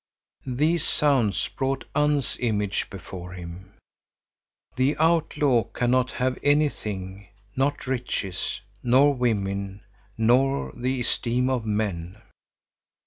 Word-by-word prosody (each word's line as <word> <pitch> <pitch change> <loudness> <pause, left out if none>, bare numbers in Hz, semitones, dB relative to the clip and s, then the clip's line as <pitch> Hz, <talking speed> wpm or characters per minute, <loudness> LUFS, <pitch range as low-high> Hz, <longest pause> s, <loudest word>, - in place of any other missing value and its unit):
These 150 +6 +1
sounds 130 -9 +2
brought 135 -1 -2
Unn's 145 -3 +1
image 105 -4 -1
before 90 -1 -8
him.—The 95 - -6
outlaw 150 -7 +3
cannot 125 +1 +1
have 130 0 -1
anything, 105 -10 0 0.3
not 140 +2 0
riches, 120 -9 -3 0.2
nor 135 +4 +5
women, 100 -5 -1 0.4
nor 130 +5 +2
the 130 +1 -1
esteem 125 +2 0
of 120 -4 -1
men. 100 -3 -2
125 Hz, 90 wpm, -25 LUFS, 100-135 Hz, 0.4 s, nor